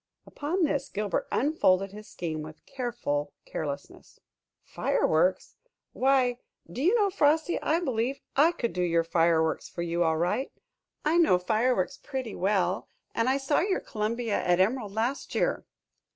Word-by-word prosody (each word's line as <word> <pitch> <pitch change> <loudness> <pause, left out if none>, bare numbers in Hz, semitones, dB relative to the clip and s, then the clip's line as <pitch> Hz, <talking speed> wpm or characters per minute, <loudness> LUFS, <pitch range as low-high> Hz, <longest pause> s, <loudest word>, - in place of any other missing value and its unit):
Upon 335 +6 -2
this, 285 -3 0
Gilbert 205 -3 -2
unfolded 195 -9 +2
his 210 +1 -11
scheme 160 -3 -4
with 155 +1 -9
a - - -37
careful 235 - -2
carelessness. 140 -2 -6 0.4
"Fireworks? 180 +4 +1 0.4
Why, 255 -2 +2 0.3
do 175 +10 -6
you 365 +10 +4
know, 410 -4 +3
Frosty, 315 -1 +2
I 320 +2 +1
believe 260 -3 -1 0.2
I 305 +5 +5
could 240 - -3
do 180 - -1
your 170 -1 +2
fireworks 165 -1 +1
for 170 - -4
you 170 0 0
all 160 -1 +2
right. 180 - 0 0.5
I 315 +3 +3
know 315 - +5
fireworks 220 +4 0
pretty 260 -6 -4
well, 185 -1 0 0.3
and 230 +2 +1
I 265 - +3
saw 275 +2 +1
your 380 +1 +1
'Columbia' 225 +1 -2
at 175 0 +2
Emerald 210 +2 +1
last 235 +6 -2
year." - - 0
220 Hz, 150 wpm, -28 LUFS, 175-275 Hz, 0.5 s, I